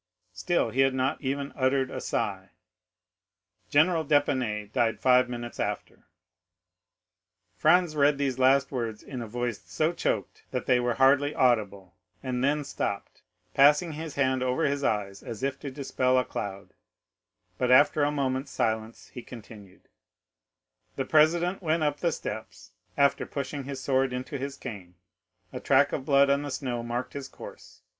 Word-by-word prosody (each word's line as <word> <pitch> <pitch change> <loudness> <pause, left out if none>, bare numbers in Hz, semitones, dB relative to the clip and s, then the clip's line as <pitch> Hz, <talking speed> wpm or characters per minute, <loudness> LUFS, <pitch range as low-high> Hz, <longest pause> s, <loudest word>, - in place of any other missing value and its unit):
Still 175 - 0
he 130 - -4
had 135 -1 +3
not 130 +1 -1
even 140 0 -3
uttered 130 0 +1
a - - -5
sigh. 95 -2 -3 1.2
General 160 +2 +3
d'Épinay 130 -8 0
died 120 -3 +1
five 125 -1 +4
minutes 120 -1 -6
after.'" - - -4 1.5
Franz 160 - +3
read 145 -1 +3
these 135 -2 -1
last 135 +1 +4
words 115 -5 -4
in 130 -3 -7
a 115 - -6
voice 120 -1 -3
so 160 +2 -1
choked - - -2
that - - -3
they 125 -1 +3
were 120 -1 0
hardly 140 +2 +3
audible, 100 -7 +1 0.3
and 125 -1 -2
then 145 +2 +1
stopped, 100 -7 -4 0.3
passing 150 +4 +5
his 155 -1 -7
hand 130 -2 +1
over 130 +5 0
his 140 0 -1
eyes 100 -4 -1
as 115 0 -8
if 135 0 -2
to 140 - -6
dispel 130 -1 0
a 125 - +2
cloud; 100 -2 -6 0.9
but 125 - +1
after 145 +3 +5
a 145 - +3
moment's 135 -1 -2
silence, 110 0 -2
he 125 - -8
continued: 105 -6 -13 1.1
"'The 135 - -2
president 170 +5 +3
went 165 -1 0
up 150 -1 0
the 170 - +1
steps, 110 -6 -7 0.3
after 140 0 +3
pushing 140 0 -5
his 135 -1 -5
sword 135 -1 +1
into 130 +2 -5
his 140 +1 -5
cane; 95 -8 -9 0.6
a - - -4
track 140 +1 +3
of 135 - -3
blood 140 0 +4
on 140 +1 +2
the 145 - -5
snow 125 -3 -3
marked 120 +2 -4
his 140 -2 -6
course. - - -13
130 Hz, 160 wpm, -27 LUFS, 120-145 Hz, 1.5 s, passing